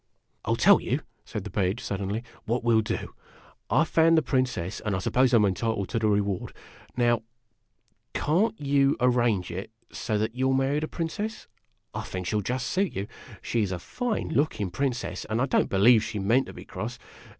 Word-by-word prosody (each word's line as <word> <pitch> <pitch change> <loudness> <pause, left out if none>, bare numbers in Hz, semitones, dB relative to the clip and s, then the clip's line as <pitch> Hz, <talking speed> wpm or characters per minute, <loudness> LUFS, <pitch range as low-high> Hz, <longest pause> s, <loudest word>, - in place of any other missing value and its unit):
"I - - -5
'11 - - +1
tell - - +7
you," - - -1 0.2
said 105 - -5
the 105 - -7
Page, 95 +3 0
suddenly, 100 +3 -3 0.2
"what 115 +2 -1
we 120 -1 +3
'11 110 -1 +1
do. - - -13 0.6
I - - +4
found 165 0 +4
the 160 - +3
Princess, 130 -10 -1
and 105 -3 -2
I - - 0
suppose 125 +7 +2
I - - +5
'm 105 - +4
entitled 100 +1 -1
to 115 +2 0
the 110 - +1
reward. 100 -3 0 0.4
Now, 120 -2 +3 0.9
can't 195 +9 +1
you 140 -1 +2
arrange 120 -7 +2
it 95 +3 -5 0.4
that 110 0 0
you 130 +1 0
'11 135 0 +3
marry 135 +2 +1
the 155 - -3
Princess? 210 +8 -4 0.5
I - - -3
think 90 -1 -5
she 90 - -2
'11 105 -3 0
just 125 0 -1
suit 195 0 0
you. 95 - -2 0.4
She 115 - 0
is 100 -3 -1
a 90 - -2
fine 240 - -3
looking 120 - 0
Princess, 125 -6 -2
and 110 +2 -1
I 130 - +3
don't 135 - +1
be 95 - 0
lieve 110 +2 +6
she 110 - -4
meant 110 +7 +2
to - - -9
be - - -10
cross. - - -5
115 Hz, 205 wpm, -27 LUFS, 100-135 Hz, 0.9 s, tell